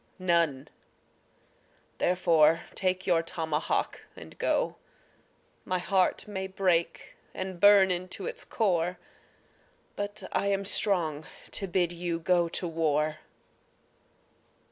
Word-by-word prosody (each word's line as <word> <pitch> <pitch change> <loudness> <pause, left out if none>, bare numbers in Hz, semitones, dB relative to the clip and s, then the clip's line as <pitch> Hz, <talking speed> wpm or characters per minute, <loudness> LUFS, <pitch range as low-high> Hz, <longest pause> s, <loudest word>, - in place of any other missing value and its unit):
None 170 -7 +1 1.3
therefore 165 -3 +3
take 185 -1 -1
your 170 -3 +3
tomahawk 160 -2 -2
and - - -12
go. - - 0 0.9
My 185 - -1
heart 185 +3 +1
may 190 -2 -4
break 185 -3 -1 0.2
and 185 -1 -5
burn 200 -1 +7
into 180 +1 -3
its 485 +1 -5
core, 180 -5 0 1.0
But 205 0 -5
I 200 - 0
am 200 0 0
strong 165 -7 +1 0.3
to 195 - -2
bid 175 -1 +1
you 175 -1 -3
go 170 0 +2
to 175 - -2
war. 155 -2 0
180 Hz, 105 wpm, -28 LUFS, 165-190 Hz, 1.3 s, burn